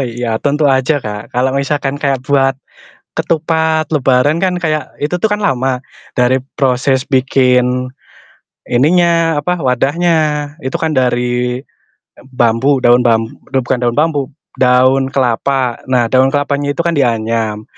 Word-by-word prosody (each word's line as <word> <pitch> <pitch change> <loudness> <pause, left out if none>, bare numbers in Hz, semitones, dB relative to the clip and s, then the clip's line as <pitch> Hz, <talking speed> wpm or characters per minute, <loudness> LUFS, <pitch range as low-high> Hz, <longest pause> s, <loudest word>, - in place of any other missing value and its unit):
iya 120 -1 -3
tentu 145 +1 +1
aja, 135 +3 +2
Kak. 105 0 -6
Kalau 125 +2 +1
misalkan 140 0 -1
kayak 135 -3 0
buat 135 -1 +2 0.6
ketupat 160 -1 0
lebaran 135 0 +2
kan 185 0 0
kayak 155 -4 -2
itu 150 +4 -1
tuh 220 - +2
kan 210 - -1
lama, 130 -8 0 0.4
dari 125 +1 +3 0.2
proses 130 0 +1
bikin 125 -1 +2 0.8
ininya, 165 +4 +2
apa, 180 +4 -2
wadahnya 150 +3 0
itu 130 - -2
kan 160 -1 0
dari, 125 0 0 0.4
eee, - - -23
bambu 120 +4 +2
daun 120 +1 +5
bam 115 -1 +2 0.2
bukan 130 -1 0
daun 120 - -1
bambu, 150 -3 0 0.3
daun 130 +1 +3
kelapa, 130 0 0
nah 120 -2 +2
daun 130 +1 +3
kelapanya 145 0 -1
itu - - -5
kan 170 -1 0
dianyam 115 -4 -1
135 Hz, 135 wpm, -14 LUFS, 125-150 Hz, 0.8 s, daun